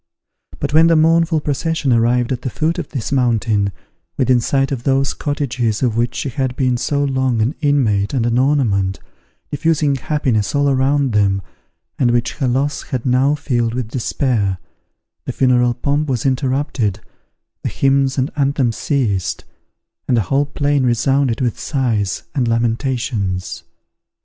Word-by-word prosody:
But 145 0 -3
when 160 +2 +6
the 165 - +4
mournful 165 0 +3
procession 150 -1 0
arrived 120 +1 +2
at 125 -1 -2
the 130 - -3
foot 155 +7 -1
of - - -5
this 130 -7 -4
mountain, 115 -6 +1 0.5
within 130 -2 +3
sight 135 +3 0
of 130 -4 -2
those 135 +1 +1
cottages 130 -6 -2
of 120 -4 +1
which 120 +1 0
she 140 - -2
had 130 0 -2
been 130 -2 +1
so 145 +3 0
long 130 -3 0
an 115 +6 +1
inmate 115 -9 +1
and 125 -4 0
an 120 +1 +1
ornament, 110 -9 +1 0.5
diffusing 150 -1 +1
happiness 130 -5 -1
all 145 0 +2
around 135 0 +1
them, 100 -2 +2 0.6
and 125 - +3
which 120 +3 0
her 135 -5 0
loss 140 +3 0
had 125 -1 -5
now 130 +3 +3
filled 120 -5 -1
with 125 -3 -3
despair, 115 -6 -1 0.7
the - - -2
funeral 125 -2 +2
pomp 145 +4 -1
was 125 -2 -1
interrupted, 130 -6 0 0.6
the - - -2
hymns 135 0 +1
and 130 +2 0
anthems 135 -5 0
ceased, 110 - -1 0.6
and 125 - +2
the - - +3
whole 135 +9 0
plain 145 -1 0
resounded 125 +1 +1
with 120 -3 -1
sighs 115 -9 -1
and 130 -5 0
lamentations. 115 -4 -1
130 Hz, 155 wpm, -18 LUFS, 115-140 Hz, 0.7 s, when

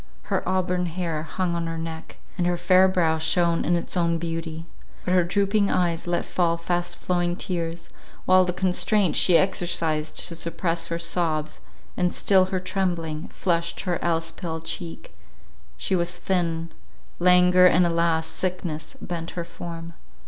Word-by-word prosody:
Her - - +2
auburn 180 -1 0
hair 165 -2 -3
hung 170 +2 -2
on 170 -1 -2
her 165 0 -4
neck, 160 0 -7 0.2
and 175 -2 0
her 175 0 +1
fair 185 +1 +5
brow 165 -4 +1
shone 170 +1 +2
in 175 - +2
its 170 - -2
own 170 -1 +2
beauty; 165 -1 -4 0.4
but 180 - +1
her 180 -1 +5
drooping 200 +3 +1
eyes 170 -2 0
let 175 0 0
fall 170 -2 +1
fast 175 +1 -2
flowing 175 -1 0
tears, 170 -2 -4 0.4
while 185 0 +6
the 180 - -1
constraint 185 +1 +1
she 175 -3 +5
exercised 165 -4 0
to - - -5
suppress 170 0 -2
her 170 - -2
sobs, 160 -3 -1 0.3
and 180 -1 +1
still 190 -2 +4
her 185 0 -2
trembling, 175 -4 -2
flushed 170 -2 -1
her 180 -3 -2
else 165 -1 0
pale 160 -2 -5
cheek; 165 - -7 0.6
she 190 - -1
was 175 0 -1
thin; 170 -3 -1 0.5
languor, 180 0 +6
and 180 0 +4
alas! 165 -1 +1
sickness, 165 -2 -4
bent 170 -1 -5
her 170 - -2
form. 170 0 -8
170 Hz, 155 wpm, -24 LUFS, 165-180 Hz, 0.6 s, while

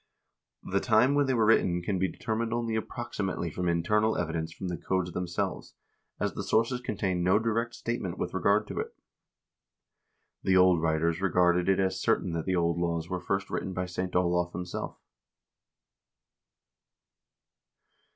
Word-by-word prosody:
The 100 - 0
time 115 +5 +4
when 145 -1 +3
they 130 - +2
were 115 -2 +3
written 90 -5 +3
can 95 0 -1
be 95 0 0
determined 115 +1 -2
only 115 -1 -1
approximately 110 - -3
from 90 - -2
internal 105 +6 +2
evidence 80 -1 -2
from 95 - -6
the 90 - -2
codes 95 +1 -1
themselves, 85 0 -3 0.4
as - - -1
the - - -4
sources 115 +3 +1
contain 95 -6 -1
no 90 +3 +4
direct 115 +1 -1
statement 115 -7 -3
with - - -3
regard - - +2
to - - -4
it. - - -5 1.5
The 95 0 +3
old 90 -2 +5
writers 80 +2 +1
regarded 90 -1 +3
it 95 - +3
as 95 -1 0
certain 110 -5 +1
that 85 -1 -3
the 95 - +1
old 85 -1 +1
laws 85 -1 -1
were 90 -1 -2
first 95 +1 -2
written 95 - -3
by 90 0 -2
St. 90 0 -4
Olav 90 -1 +1
himself. 90 -1 -5
95 Hz, 155 wpm, -29 LUFS, 85-110 Hz, 1.5 s, old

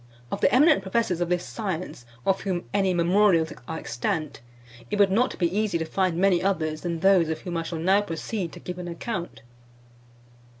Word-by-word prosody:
Of - - -3
the - - +4
eminent 295 0 +5
professors 190 -3 -1
of 175 - 0
this 180 0 0
science, 185 - -5 0.2
of 195 0 +2
whom 185 -3 -2
any 195 -2 +2
memorials 175 -2 +3
are 160 - -4
extant, 150 - -3 0.5
it 210 - -1
would 200 -2 +4
not 245 +6 +1
be 175 +1 0
easy 210 -4 +1
to 160 - -3
find 180 +1 0
many 185 -1 +3
others 155 -5 -1
than 170 -2 -3
those 190 -4 +4
of 160 -1 -3
whom 175 -1 -5
I 165 - 0
shall 165 0 -5
now 190 +5 +3
proceed 185 0 -4
to - - -9
give 180 0 -7
an 180 - -6
account. 170 - -5
180 Hz, 190 wpm, -25 LUFS, 165-195 Hz, 0.5 s, eminent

